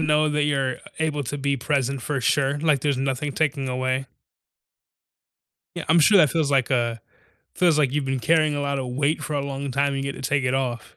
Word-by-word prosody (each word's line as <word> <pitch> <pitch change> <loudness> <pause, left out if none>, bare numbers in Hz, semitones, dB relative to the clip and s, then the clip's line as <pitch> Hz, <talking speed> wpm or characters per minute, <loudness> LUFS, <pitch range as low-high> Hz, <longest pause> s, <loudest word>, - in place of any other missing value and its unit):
know 155 0 +2
that 150 0 0
you're 135 -3 0 0.2
able 155 -2 -1
to 145 +4 -4
be 140 0 0
present 135 0 -1
for 145 -3 -2
sure, 135 +4 +1
like 150 -3 +2
there's 145 -1 0
nothing 135 +2 -2
taking 145 -2 -1
away. 130 +1 -1 1.7
Yeah, - - -5
I'm 160 +2 +5
sure 195 +6 +6
that 155 -6 +5
feels 155 -2 0
like, 135 -3 +2
uh 120 -3 +1 0.6
feels 175 -4 +3
like 140 -4 +2
you've 145 +1 -1
been 135 -1 -2
carrying 155 +1 +2
a 145 - -2
lotta 140 -2 -2
weight 140 +5 -1
for - - -5
a 145 - 0
long 140 0 -4
time 140 +2 0
and 135 0 -3
you 140 - -3
get - - -10
to 135 - -2
take 145 -1 +1
it 125 - +1
off. 125 -4 -3
140 Hz, 220 wpm, -23 LUFS, 130-150 Hz, 1.7 s, sure